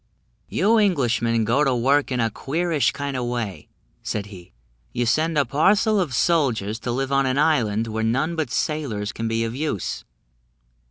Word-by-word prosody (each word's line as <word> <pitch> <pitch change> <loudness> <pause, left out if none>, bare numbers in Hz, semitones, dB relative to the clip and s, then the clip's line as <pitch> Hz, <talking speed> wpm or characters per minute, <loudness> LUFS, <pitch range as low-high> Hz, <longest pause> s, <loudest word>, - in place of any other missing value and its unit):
"You 225 +2 +2
Englishmen 120 - +1
go 120 +7 +2
to 135 -3 +2
work 135 +4 +2
in 125 - -1
a 115 -1 +1
queerish 160 +5 0
kind 140 -1 -4
of 125 -1 -2
way," 120 -6 -4 0.3
said 105 -2 -3
he; 95 -4 -13 0.4
"you 120 - 0
send 155 +7 +1
a 145 - +3
parcel 200 - +3
of 155 -10 -1
soldiers 115 - +1
to 120 +2 -3
live 135 +2 -2
on 135 -1 +2
an 130 +1 0
island 115 -8 +2
where 110 0 -3
none 135 +9 0
but 160 -5 -2
sailors 130 -8 -2
can 115 +1 -4
be 115 0 0
of 115 0 -3
use. 140 - -3
130 Hz, 175 wpm, -23 LUFS, 115-150 Hz, 0.4 s, a